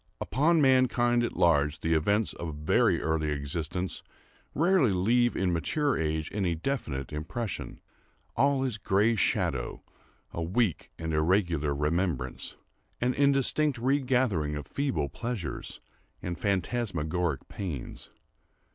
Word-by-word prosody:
Upon 155 +6 +2
mankind 120 -2 +3
at 120 - -3
large 80 -3 +3
the 80 - +1
events 100 +7 +1
of 80 -3 -6
very 75 +1 +2
early 80 -1 0
existence 75 +5 -3 0.5
rarely 170 - +4
leave 120 +6 +2
in 90 -2 +1
mature 140 - 0
age 80 -1 -2
any 95 -5 0
definite 80 - -3
impression. 80 - -4 0.6
All 135 +2 +3
is 120 -5 -2
gray 105 +4 +2
shadow—a 70 - -3
weak 95 +2 0
and 80 -1 -3
irregular 80 -3 +1
remembrance—an 80 - -3
indistinct 140 +1 +2
regathering 125 - +1
of 75 -1 -5
feeble 85 - -1
pleasures 95 - -5 0.4
and 90 - -4
phantasmagoric 90 - -1
pains. 85 -11 -6
90 Hz, 110 wpm, -28 LUFS, 75-120 Hz, 0.6 s, rarely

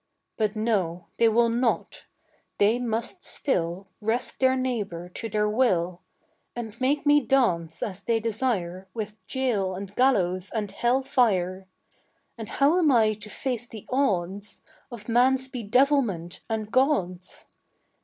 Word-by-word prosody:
But 215 0 0
no, 190 -6 -1
they 230 - +6
will 235 +1 +3
not; 235 +1 -1 0.5
they 215 +4 +3
must 235 - -3
still 180 -5 -2
Wrest 225 +4 -1
their 260 0 +4
neighbour 210 -10 -3
to 225 +5 -6
their 210 0 +1
will, 185 -7 +1 0.5
And 235 0 -7
make 280 +3 +1
me 295 0 +6
dance 175 - +1
as 200 -2 -5
they 230 +1 +1
desire 210 -5 -2
With 215 -1 -6
jail 220 -8 0
and 200 +1 -8
gallows 185 -8 +2
and 210 -3 -3
hell 245 +6 +1
fire. 190 -8 +1 0.7
And 225 -3 -7
how 295 +6 +3
am 315 -5 +4
I 220 -4 +4
to 210 0 -10
face 245 0 -3
the 220 -3 -10
odds 200 -6 -1 0.3
Of 225 -3 -9
man's 260 +3 +3
bedevilment 240 - +1
and 220 -1 -3
God's? 185 -10 0
220 Hz, 135 wpm, -26 LUFS, 190-255 Hz, 0.7 s, they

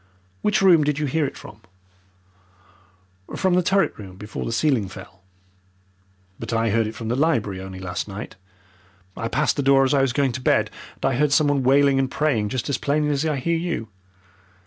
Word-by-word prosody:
"Which 210 -2 +1
room 170 -5 +6
did 145 -1 0
you 155 - -1
hear 150 +1 0
it - - -9
from?" 105 0 -12 1.7
"From 185 -1 +1
the 180 - +4
turret 195 +2 +1
room, 95 -3 -10
before 105 +2 -6
the - - -3
ceiling 120 -4 +1
fell." 95 0 -12 1.2
"But 115 - -6
I 115 -1 +1
heard 115 0 +1
it 110 - -7
from 115 -1 -5
the 120 - 0
library 115 - 0
only 95 0 -8
last 90 +1 -4
night. 105 +1 -8 0.8
I 115 - -3
passed - - 0
the - - +1
doors 135 -1 +4
as - - +3
I - - +3
was 135 -2 +2
going 140 -1 +1
to 130 +2 -5
bed, - - +2 0.2
and - - -6
I 135 - +2
heard 150 0 +2
something 145 -1 +3
wailing 135 +1 +4
and 135 -1 0
praying 130 -8 0
just 125 +1 -3
as 140 -3 -1
plainly 150 +1 0
as 145 +2 0
I 155 - 0
hear 165 +5 0
you. 165 -10 -3
135 Hz, 200 wpm, -23 LUFS, 110-150 Hz, 1.7 s, room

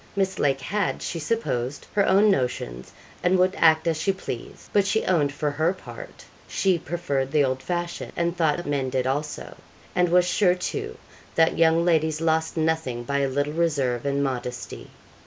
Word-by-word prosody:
Miss 190 -1 0
Lake 135 -1 +1
had, 200 +9 -1
she 170 - -3
supposed, 145 - -2
her 205 - +3
own 200 +2 +5
notions, 95 - -2 0.3
and 180 +1 +3
would 185 +1 +3
act 160 -1 +4
as 165 -2 +1
she 195 - +2
pleased; 155 -10 -7
but 200 -1 +3
she 220 +2 +1
owned 155 -6 +2
for 145 +1 -2
her 160 +5 +1
part - - -11 0.2
she 190 -3 +1
preferred 145 -6 -2
the 150 -1 +4
old 130 -1 -1
fashion, 175 +4 -4
and 170 0 0
thought 160 -4 +2
the 175 - -5
men 140 -2 -1
did 130 0 -1
also; 145 +3 -3 0.4
and 180 -1 +3
was 180 +1 +4
sure, 180 -1 +3
too, 425 - -4 0.4
that 160 0 +3
young 165 +1 +4
ladies 160 -2 +2
lost 160 0 0
nothing 160 -7 0
by 140 +3 -1
a 140 - +1
little 145 +2 -1
reserve 140 -8 0
and 140 0 0
modesty. 125 -2 -4
160 Hz, 180 wpm, -25 LUFS, 140-180 Hz, 0.4 s, own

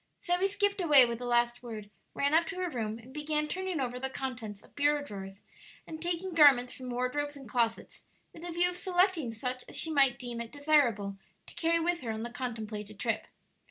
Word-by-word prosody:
Zoe 360 0 +1
skipped 400 0 0
away 295 -7 +8
with 235 -1 -3
the 250 - -5
last 240 0 +2
word, 215 -4 -8 0.2
ran 280 +1 +1
up 330 +1 +4
to 390 - -5
her 365 -2 -2
room, 220 -4 -3
and 245 +3 -14
began 300 0 -1
turning 370 0 -3
over 250 -1 -2
the 265 +1 -2
contents 230 -7 -5
of - - -21
bureau 290 0 +2
drawers 195 -4 -9 0.4
and 315 0 -8
taking 350 +2 -2
garments 275 -6 +6
from 255 -1 -8
wardrobes 285 +4 -2
and 270 -3 -11
closets, 230 0 -1 0.3
with 330 - -12
the 350 - -6
view 345 +1 +3
of 355 - -8
selecting 360 - +1
such 250 +3 -3
as - - -9
she 320 - +1
might 270 -5 +4
deem 240 -2 -5
it 230 - -7
desirable 245 -10 +2 0.3
to - - -14
carry 335 0 +2
with 340 +1 0
her 240 - -6
on 220 0 -3
the 240 - -5
contemplated 215 -4 -5
trip. 230 -2 -1
265 Hz, 210 wpm, -30 LUFS, 235-325 Hz, 0.4 s, away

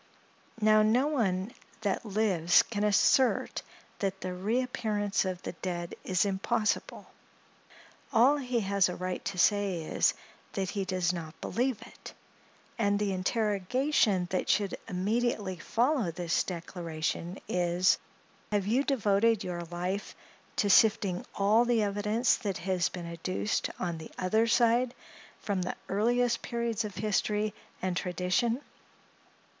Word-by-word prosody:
Now, 215 0 +5
no 230 +5 +3
one 220 -8 0 0.3
that 200 -3 -1
lives 195 -6 +3
can 210 -2 -3
assert 210 +5 +3 0.4
that 195 -1 -2
the 185 0 -3
reappearance 210 0 -1
of 185 -1 -4
the - - -4
dead 175 -1 -5
is 185 +1 +1
impossible; 210 +3 -1 1.1
all 260 +6 +5
he 250 -4 -1
has 200 -2 +2
a 180 - -4
right 185 0 -4
to 200 - -3
say 195 -3 +2
is, - - +1 0.4
that 190 -2 -2
he 200 -2 -2
does 180 -1 0
not 160 -3 -7
believe 245 -1 -1
it; - - -12 0.6
and 205 -2 +2
the 205 -1 0
interrogation 210 +2 +1
that 185 - -1
should 200 -2 +2
immediately 205 0 -1
follow 240 - +1
this 170 0 0
declaration 170 0 -4
is, 175 +1 +2 0.5
"Have 205 -2 +1
you 240 +7 +2
devoted 225 -4 +2
your 175 -2 -4
life 180 +4 -3 0.4
to 205 - +1
sifting 200 -4 +4
all 210 +4 +4
the 240 -2 +2
evidence 210 +4 +1
that 200 -4 -3
has 185 -1 0
been 175 -2 -7
adduced 170 +5 -2
on 170 -3 -3
the 160 - -9
other 220 +5 +2
side, 240 +2 +3 0.5
from 200 -3 -1
the 180 - -3
earliest 235 +4 +1
periods 235 -2 -2
of 210 -2 -6
history 210 +1 0 0.3
and 185 -1 0
tradition?" 185 +8 0
200 Hz, 130 wpm, -30 LUFS, 185-225 Hz, 1.1 s, Now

